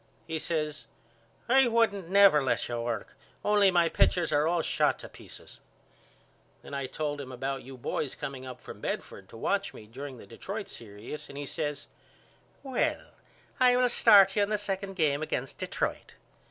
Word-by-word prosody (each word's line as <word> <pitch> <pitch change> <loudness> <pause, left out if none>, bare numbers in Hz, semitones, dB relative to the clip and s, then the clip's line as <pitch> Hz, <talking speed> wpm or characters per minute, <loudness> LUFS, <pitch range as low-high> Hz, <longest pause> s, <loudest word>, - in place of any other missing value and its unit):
He 160 -1 -3
says 155 -2 -2 0.6
I 265 +1 +5
wouldn't 220 -6 +1
never 195 -6 +7
let 130 - 0
you 120 -1 -3
work 115 -3 -4 0.3
only 205 -1 +5
my 175 -2 +4
pitchers 175 +1 +2
are 150 +1 +3
all 170 -1 +1
shot - - +1
to - - -10
pieces. - - -13 1.0
Then - - -10
I 140 -1 -2
told 145 0 -3
him 130 -2 -8
about 135 +2 -3
you 130 +1 -11
boys 130 +2 -3
coming 135 -2 -6
up 130 -1 -8
from - - -11
Bedford 95 -1 -5
to - - -11
watch 200 - -1
me 105 - -11
during 130 +4 -8
the 110 - -12
Detroit 195 - -6
serious 110 +6 -8
and 140 - -9
he 145 - -4
says 145 -1 -3 0.8
Well 265 -2 -1 0.5
I 250 -1 +5
will 250 0 +3
start 195 -4 +6
you 210 - +3
in 200 - +1
the 210 - +1
second 195 -1 -3
game 150 -4 +1
against 135 -4 -3
Detroit. - - -3
155 Hz, 175 wpm, -29 LUFS, 135-200 Hz, 1.0 s, never